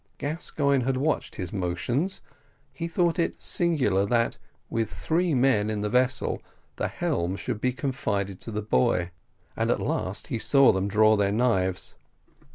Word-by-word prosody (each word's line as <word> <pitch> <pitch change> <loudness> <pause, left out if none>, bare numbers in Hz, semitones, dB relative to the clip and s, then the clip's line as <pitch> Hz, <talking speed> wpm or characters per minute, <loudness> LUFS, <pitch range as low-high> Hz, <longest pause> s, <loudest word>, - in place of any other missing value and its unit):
Gascoigne 140 -3 0
had 130 0 0
watched 150 +3 -1
his 90 -3 -5
motions; 105 - -1 0.5
he 165 - -4
thought 170 0 +1
it 170 - 0
singular 135 - +1
that, 115 +1 +1 0.3
with 115 -2 -1
three 170 -1 0
men 120 -5 +3
in 105 -1 -2
the 105 0 -2
vessel, 125 +1 +1 0.4
the - - 0
helm 85 +2 -1
should 105 - -4
be 130 - +2
confided 110 -8 -2
to - - -6
the 105 -1 -3
boy 85 0 +1 0.4
and - - 0
at - - +2
last 95 +1 -2
he 115 - -2
saw 135 +3 +5
them 95 +1 -1
draw 110 +2 +4
their 100 -1 +1
knives. 95 -5 0
115 Hz, 160 wpm, -26 LUFS, 100-140 Hz, 0.5 s, saw